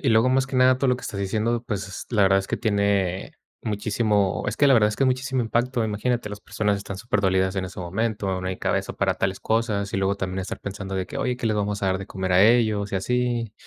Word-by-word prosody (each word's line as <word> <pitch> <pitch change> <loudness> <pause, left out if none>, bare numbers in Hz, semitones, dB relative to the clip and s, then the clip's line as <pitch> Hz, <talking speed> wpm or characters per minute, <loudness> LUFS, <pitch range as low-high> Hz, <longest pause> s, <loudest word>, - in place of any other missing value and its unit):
y 140 - +1
luego, 115 +2 +4
más 130 +1 +2
que 135 - -8
nada, 130 0 +5
todo 135 +1 0
lo 125 - +3
que - - -12
estás 100 - -5
diciendo, 110 +4 0
pues, 100 -2 -5
la 110 -4 +3
verdad 95 0 +5
es 95 - -3
que - - -2
tiene 100 -4 0 0.3
muchísimo, 105 -2 0
es - - -2
que 145 - +4
la 135 - +6
verdad 105 -3 +5
es 105 - -5
que - - 0
es - - +3
muchísimo 130 0 0
impacto, 120 +1 0
imagínate, 110 +2 -1
las 105 0 -8
personas 105 -1 -1
están 100 -1 -7
superdolidas 95 -3 +1
en 95 - -1
ese 95 0 -7
momento, 95 +1 -2
no 95 - -5
hay 95 0 -3
cabeza - - -1
para - - 0
tales 95 0 -2
cosas, 110 -3 0
y - - 0
luego 95 +1 +1
también 95 -1 -3
estar 95 - -6
pensando 100 -1 -6
de 95 -1 -2
que, - - -7
oye, 125 -1 -1
¿qué 120 - -3
les 110 -1 +1
vamos 105 0 -2
a - - +2
dar 95 0 +1
de 95 - -7
comer 95 -2 -3
a 90 +1 +6
ellos? 110 -3 +3
Y - - +1
así. 120 +1 -1
105 Hz, 260 wpm, -24 LUFS, 95-120 Hz, 0.3 s, la